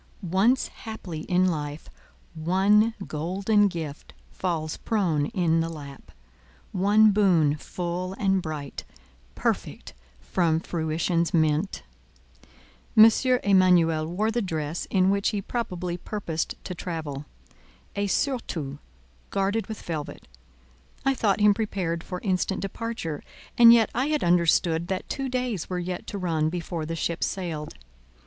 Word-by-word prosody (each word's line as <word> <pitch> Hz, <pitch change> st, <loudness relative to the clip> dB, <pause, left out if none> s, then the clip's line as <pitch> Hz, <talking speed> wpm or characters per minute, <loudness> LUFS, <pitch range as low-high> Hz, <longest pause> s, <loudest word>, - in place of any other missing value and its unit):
Once 195 Hz, +9 st, +2 dB
haply 210 Hz, -8 st, -7 dB
in 180 Hz, 0 st, +3 dB
life, 150 Hz, -3 st, -3 dB, 0.5 s
one 195 Hz, +7 st, +3 dB
golden 195 Hz, +7 st, +1 dB
gift 160 Hz, -6 st, -6 dB, 0.2 s
falls 160 Hz, -4 st, -2 dB
prone 175 Hz, -10 st, 0 dB
in 175 Hz, -6 st, +1 dB
the 165 Hz, 0 st, 0 dB
lap—one 140 Hz, -, -1 dB
boon 175 Hz, -8 st, +3 dB
full 180 Hz, +3 st, -4 dB
and 195 Hz, -1 st, +1 dB
bright, 150 Hz, -4 st, -6 dB, 0.5 s
perfect -, -, -2 dB, 0.3 s
from 160 Hz, -, +1 dB
Fruition's 165 Hz, +1 st, -1 dB
mint. 155 Hz, +4 st, +1 dB, 1.1 s
M. 220 Hz, +1 st, +10 dB, 0.3 s
Emanuel 175 Hz, -5 st, +4 dB
wore 205 Hz, +6 st, 0 dB
the 240 Hz, +1 st, 0 dB
dress 160 Hz, -4 st, -3 dB
in 190 Hz, -1 st, +3 dB
which 200 Hz, 0 st, +1 dB
he 205 Hz, -, -2 dB
probably 180 Hz, -5 st, -3 dB
purposed 175 Hz, -5 st, -3 dB
to 180 Hz, -, -5 dB
travel—a 155 Hz, -, -7 dB
surtout, 170 Hz, -, -2 dB, 0.5 s
guarded 200 Hz, +3 st, 0 dB
with 220 Hz, -2 st, -7 dB
velvet; 155 Hz, -3 st, -5 dB, 0.8 s
I 270 Hz, -, +4 dB
thought 215 Hz, -5 st, +1 dB
him 210 Hz, 0 st, +6 dB
prepared 185 Hz, -6 st, -2 dB
for 180 Hz, -2 st, -5 dB
instant 190 Hz, -1 st, 0 dB
departure, 195 Hz, -6 st, -4 dB, 0.3 s
and 235 Hz, -1 st, +9 dB
yet 230 Hz, -2 st, +5 dB
I 255 Hz, +4 st, 0 dB
had 300 Hz, -1 st, 0 dB
understood 170 Hz, -1 st, +3 dB
that 190 Hz, 0 st, -3 dB
two 270 Hz, -1 st, -3 dB
days 250 Hz, -8 st, -2 dB
were 180 Hz, -, -2 dB
yet 180 Hz, 0 st, -4 dB
to 205 Hz, -, -4 dB
run 160 Hz, -4 st, 0 dB
before 170 Hz, -2 st, -4 dB
the 165 Hz, -, -3 dB
ship 165 Hz, +1 st, -2 dB
sailed. 165 Hz, -6 st, -3 dB
180 Hz, 125 wpm, -26 LUFS, 160-200 Hz, 1.1 s, M